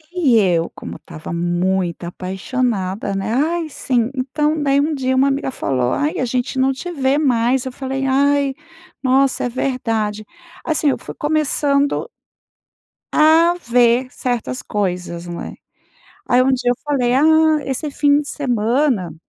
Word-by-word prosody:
E 275 -10 +3
eu, 175 -5 +2
como - - -8
estava 160 0 -10
muito 175 +1 -1
apaixonada, 190 +2 -3
né. 195 +4 -2
"Ai, 320 +4 0
sim". 250 -3 -1
Então, 300 +4 -1
daí 275 -1 +2
um 305 +2 +1
dia 260 -2 -1
uma 270 +2 +4
amiga 275 -1 -1
falou: 130 - -1
"Ai, 295 +2 -1
a 255 - +1
gente 250 +2 -2
não 265 +1 +3
te 350 +7 -6
vê 275 -3 +1
mais". 250 -2 +1
Eu 260 - -4
falei: 270 +1 -4
"Ai, 280 +1 +2 0.5
nossa! 265 0 +2
É - - -1
verdade". 225 -5 -2 0.4
Assim, 305 -2 +1
eu - - 0
fui - - -9
começando 290 -2 0 1.0
a 320 +3 +5 0.2
ver 240 +1 +4
certas 250 0 -3
coisas, 180 -4 -3
num 170 - -6
é. - - -7 0.7
Aí, 250 +1 +4
um 265 +1 +2
dia 245 -1 +1
eu 245 - 0
falei: 260 -4 +1
"Ah, 315 +2 +4
esse 270 +3 -3
fim 285 0 +3
de 290 - -7
semana, 235 - 0
260 Hz, 150 wpm, -19 LUFS, 220-285 Hz, 1.0 s, a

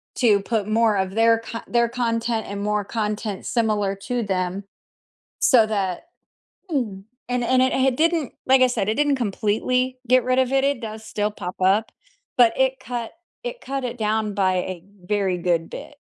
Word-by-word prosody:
to 215 -5 +4
put 210 0 -2
more 220 -1 +3
of 190 -1 -1
their 230 0 +4
co 230 0 -6
their 235 -1 +2
content 230 -2 -1
and 200 0 -5
more 210 0 0
content 210 -2 -3
similar 210 -4 0
to 240 +5 -3
them, 190 -1 -2 0.8
so 235 -5 +5
that 195 - -2 0.7
Mm, 220 -10 -2 0.3
and 250 0 0
it - - -2
and 255 0 +5
it 260 - +2
h 265 -1 +2
didn't, 325 -4 +1
like 260 0 +5
I 255 - +6
said, 215 -4 -1
it 215 - +2
didn't 290 0 +2
completely 250 +3 0
get 255 +1 +5
rid 255 0 +1
of 260 0 +2
it, 270 0 +3
it 280 -3 +1
does 220 -1 -7
still 210 -1 -1
pop 180 -3 -6
up, 195 +4 +3 0.5
but 235 -2 +6
it 265 0 +2
cut 240 -1 -4 0.3
it - - -5
cut 275 +1 -4
it 245 0 -4
down 215 -1 0
by 190 -2 +2
a 180 -1 -4 0.2
very 195 -1 0
good 170 -2 0
bit. - - -9
225 Hz, 185 wpm, -23 LUFS, 205-250 Hz, 0.8 s, I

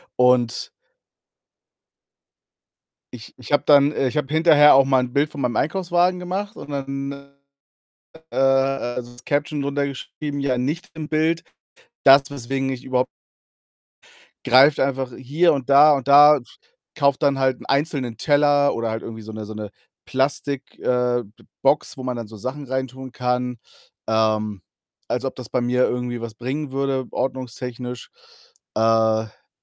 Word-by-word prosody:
und 125 -2 +2 2.4
ich 115 -2 -11
ich 130 - -11
habe 145 - +3
dann 145 -1 +5
äh, 135 - -1
ich 140 - -4
habe 150 0 -2
hinterher 155 -3 +6
auch 135 0 +6
mal 135 -1 +3
'n 125 -1 -5
Bild 145 +2 +1
von 140 - -7
meinem 125 -3 -1
Einkaufswagen 180 - +1
gemacht 195 +4 -4
und - - -10
dann, 135 0 -4
äh, 140 0 -16 0.7
äh, - - -4
also, 135 -2 +1
das 120 0 -17
Caption 145 0 -1
drunter 140 0 -1
geschrieben: 145 +2 -6
„Ja, 135 -3 0
nicht 145 +8 -3
im 155 -1 -6
Bild. 160 +1 0 0.6
Das, 135 +1 +6
weswegen 135 0 -3
ich 130 -1 -6
überhaupt“ 130 -1 0 1.4
Greift 135 +4 +6
einfach 135 -1 -1
hier 150 +7 +2
und 135 -3 -4
da 145 +2 +7
und 135 -1 -8
da 145 +1 +8
z - - -21 0.4
kaufe 140 -3 +2
dann 140 -2 +1
halt 130 -1 +1
'n - - -13
einzelnen 140 -4 -1
Teller 145 +3 +3
oder 115 -1 -2
halt 110 0 -4
irgendwie 110 -1 -8
so 110 - -9
'ne 110 0 -7
so 110 +1 -9
'ne 105 -1 -7 0.3
Plastik 135 +1 -2
äh, 125 -1 0
B 100 - -22 0.2
Box, - - +1
wo 130 - -7
man 125 -1 -3
dann 115 -2 -6
so 110 +1 -12
Sachen 130 +7 -6
reintun 130 0 -5
kann. 125 0 -2 0.5
Ähm, 110 -2 0 0.5
als 125 +2 -2
ob 135 - -4
das 125 -4 -9
bei 125 - -1
mir 125 +1 +2
irgendwie 125 -1 -3
was 115 -1 -7
bringen 135 +5 -4
würde, 135 -1 -1
ordnungstechnisch. 125 -1 -5 0.6
Äh, - - 0
dann 110 -1 +1
135 Hz, 160 wpm, -22 LUFS, 125-145 Hz, 2.4 s, da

